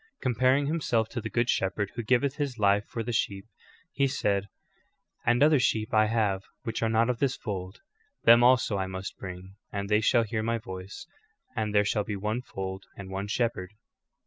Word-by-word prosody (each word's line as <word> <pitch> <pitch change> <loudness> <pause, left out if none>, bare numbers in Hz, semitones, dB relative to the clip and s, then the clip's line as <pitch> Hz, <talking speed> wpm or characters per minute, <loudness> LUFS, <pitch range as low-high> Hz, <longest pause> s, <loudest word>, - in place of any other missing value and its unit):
Com 130 -2 +1
paring 130 +4 +3
Himself 130 -8 0
to 120 - -4
the - - -5
good 120 0 +1
shepherd 100 -2 0
vrho 120 - -3
giveth 130 +3 +2
his 140 -5 -2
life 100 -1 +3
for 115 - -4
the 120 +1 -3
sheep, 100 -4 -1 0.5
He 140 -1 +2
said: 100 -6 0 0.8
"And 120 +3 +4
other 150 -1 +5
sheep 110 -3 0
I 110 0 +5
have 105 -4 +1 0.2
which 115 -1 -3
are 115 - +2
not 115 +1 +3
of 120 - -6
this 135 -2 +1
fold; 95 - -6 0.4
them 115 +1 +7
also 120 -5 +4
I 95 - -1
must 95 +1 -6
bring, 95 +1 -8
and 100 0 -4
they 105 0 +3
shall 115 +1 +4
hear 110 0 -2
my 115 +1 0
voice, 95 - -8 0.5
and 110 -3 -1
there 105 0 +5
shall 105 0 +1
be 105 0 -4
one 105 +5 -2
fold 95 -5 -6
and 95 -1 -8
one 100 +1 -3
shepherd."' 105 -4 -1
110 Hz, 200 wpm, -28 LUFS, 100-120 Hz, 0.8 s, them